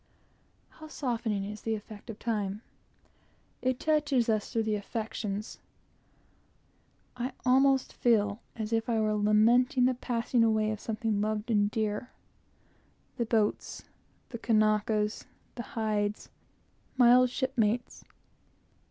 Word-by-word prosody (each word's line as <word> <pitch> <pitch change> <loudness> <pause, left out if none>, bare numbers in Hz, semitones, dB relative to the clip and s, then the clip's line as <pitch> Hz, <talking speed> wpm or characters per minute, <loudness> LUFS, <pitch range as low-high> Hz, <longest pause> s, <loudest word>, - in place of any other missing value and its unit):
How 310 - -12
softening 230 -8 -2
is 210 +1 -7
the 225 -1 -1
effect 215 +1 -11
of 220 - -6
time! 210 -2 -3 1.0
It 255 0 0
touches 290 -6 +1
us 215 -2 0
through 225 -2 0
the 215 -1 -1
affections. 210 0 -4 1.6
I 250 +1 -3
almost 265 +1 +3
feel 210 -3 +1
as 220 0 -4
if 225 +1 0
I 225 -2 +1
were 215 0 +1
lamenting 225 +5 +4
the 255 - +3
passing 240 -1 0
away 215 -1 +2
of 215 - -4
something 215 -2 -2
loved 215 +2 -2
and 205 -2 +3
dear, 215 +2 -2 1.1
the 235 - -1
boats, 220 -2 0 0.5
the 235 - -7
Kanakas, 215 -1 +1 0.3
the 240 - -5 0.2
hides, 210 -1 -1 0.7
my 245 -1 +7
old 250 0 +5
shipmates. 245 -3 -1
225 Hz, 120 wpm, -29 LUFS, 210-245 Hz, 1.6 s, my